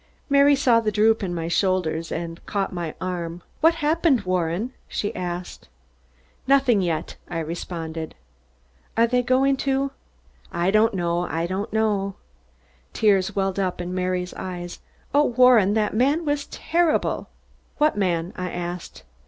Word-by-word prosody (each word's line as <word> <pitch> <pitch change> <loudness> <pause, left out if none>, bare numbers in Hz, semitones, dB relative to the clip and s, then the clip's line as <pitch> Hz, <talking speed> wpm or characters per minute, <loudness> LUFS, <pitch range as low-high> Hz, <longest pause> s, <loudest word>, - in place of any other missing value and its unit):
Mary 280 0 +6
saw 250 -4 +4
the 215 -2 0
droop 220 +2 +3
in 190 -3 -2
my 165 -1 -3
shoulders 170 -3 0
and 165 0 -5
caught 200 -2 -1
my 170 -3 -4
arm. 175 -2 -4 0.2
"What 325 +1 +4
happened, 310 -5 +3
Warren?" 185 +5 -1
she 205 - -3
asked. 175 - -5 0.8
"Nothing 265 -6 +4
yet," 165 -3 -2
I - - -4
responded. 165 0 -5 0.8
"Are 230 - +6
they 250 +1 +2
going 265 +2 +2
to 275 0 0 0.3
?" - - -38 0.3
"I 175 +2 +1
don't 215 0 +3
know, 175 -1 0
I 165 +1 -1
don't 190 +4 -3
know." 205 -3 0 0.8
Tears 200 -4 +2
welled 195 -1 0
up 185 -2 -1
in 175 +1 -4
Mary's 180 0 -2
eyes. 175 -1 -6 0.3
"Oh, 290 +1 +5
Warren, 240 -5 +5
that 215 -1 +1
man 280 +9 +2
was 290 -1 -1
terrible!" 335 -1 0 0.5
"What 300 +1 +3
man?" 175 -3 0
I 180 0 -3
asked. 175 0 -6
195 Hz, 145 wpm, -24 LUFS, 175-250 Hz, 0.8 s, Mary